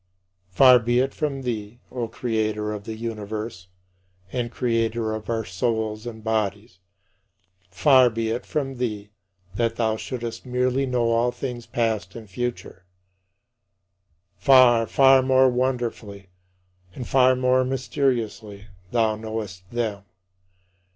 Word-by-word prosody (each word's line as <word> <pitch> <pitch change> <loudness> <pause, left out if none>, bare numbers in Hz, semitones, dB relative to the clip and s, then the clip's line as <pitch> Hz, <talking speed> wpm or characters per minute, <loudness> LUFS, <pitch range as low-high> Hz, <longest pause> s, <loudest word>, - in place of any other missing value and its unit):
But 90 - -31
far 130 -2 +8
be 120 +1 0
it 135 +1 0
from 140 -3 -3
thee, 115 -2 -4
O 120 -2 -3
Creator 110 -3 -2
of 105 -1 -6
the 110 - -5
universe, 110 -4 -6 0.7
and 120 -2 -2
Creator 115 -3 -1
of 110 +1 -6
our 115 -2 -1
souls 110 +3 -2
and 110 -2 -8
bodies 105 -3 -2 0.9
far 130 +6 +5
be 115 -1 -2
it 120 +2 -3
from 135 -3 -3
thee 105 -4 -4 0.5
that 115 -1 0
thou 110 -2 0
shouldst 115 -1 -6
merely 125 +1 0
know 120 -2 +1
all 115 +1 +2
things 125 -1 -6
past 115 -3 -2
and 115 -2 -9
future. 115 -3 -5 1.5
Far, 125 -4 +5
far 135 -1 +5
more 130 0 +4
wonderfully, 120 -6 -3 0.7
and 125 - -6
far 130 -1 +4
more 130 0 +2
mysteriously 115 -6 -2 0.2
thou 110 -2 +1
knowest 105 -4 -6
them. 110 -5 -3
115 Hz, 125 wpm, -24 LUFS, 110-125 Hz, 1.5 s, far